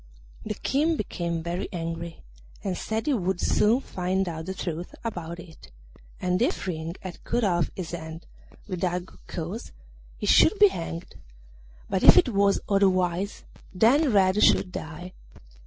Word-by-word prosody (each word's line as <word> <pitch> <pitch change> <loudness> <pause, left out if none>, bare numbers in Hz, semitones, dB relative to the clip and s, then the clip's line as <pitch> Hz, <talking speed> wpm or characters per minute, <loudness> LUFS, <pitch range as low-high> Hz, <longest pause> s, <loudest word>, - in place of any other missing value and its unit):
The 215 -1 -4
King 305 +8 +1
became 170 -5 -3
very 175 +2 -3
angry, 165 -1 -5 0.4
and 190 -2 -1
said 220 +5 -3
he 300 - +2
would 190 -5 -1
soon 225 +8 +3
find 185 -2 -1
out 160 0 -5
the 190 - -4
truth 175 -1 -5
about 175 -7 -5
it, 165 - -13 0.5
and 180 +1 0
if 275 - 0
Ring 165 -2 -4
had 185 -2 -8
cut 240 0 0
off 175 -4 +2
his 180 -4 -5
hand 160 -1 -7 0.4
without 180 -2 -2
good - - -20
cause 180 +6 -5 0.5
he - - -4
should 430 - +5
be 415 0 +7
hanged; 165 - -6 0.7
but - - -1
if - - +9
it - - +6
was 200 -2 +2
otherwise, 190 -1 +1 0.3
then 255 - +4
Red 195 0 +4
should 185 - +4
die. 175 +3 -7
185 Hz, 155 wpm, -26 LUFS, 170-205 Hz, 0.7 s, if